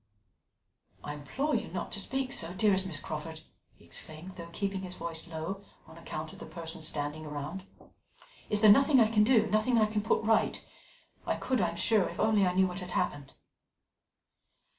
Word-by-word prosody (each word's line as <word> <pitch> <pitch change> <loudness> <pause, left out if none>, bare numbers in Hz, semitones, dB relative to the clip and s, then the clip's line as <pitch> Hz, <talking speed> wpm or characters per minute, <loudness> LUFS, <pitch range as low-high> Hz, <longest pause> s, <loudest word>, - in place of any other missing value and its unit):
"I 145 - -4
implore 265 - -2
you - - 0
not - - -5
to - - -2
speak 265 0 -1
so, 170 +1 +1
dearest 190 -1 +3
Miss 155 -6 -1
Crawford," 160 +1 -6 0.3
he - - -21
exclaimed, 160 +4 -9
though 170 -1 -8
keeping 195 +1 -2
his 180 -1 -7
voice 165 -1 -5
low 170 +5 -5 0.2
on 160 - -14
account 160 -1 -6
of - - -13
the - - -8
persons 165 -2 -4
standing 150 +1 -3
round. 150 +6 -6 0.8
"Is 210 -1 +1
there 215 -2 +9
nothing 275 +4 +6
I 220 -2 +5
can 210 -2 +5
do, 225 -1 +5
nothing 215 +4 +2
I 220 - +5
can 210 0 -1
put 220 - +1
right? 220 0 +2 0.7
I - - +1
could, 255 -5 0
I 175 - +2
am 170 - -7
sure, 210 +1 +2
if - - -9
only 215 -3 +4
I 180 - 0
knew 190 0 +5
what 180 0 -4
had 180 -1 -7
happened." 145 -2 -2
185 Hz, 190 wpm, -30 LUFS, 160-215 Hz, 0.8 s, there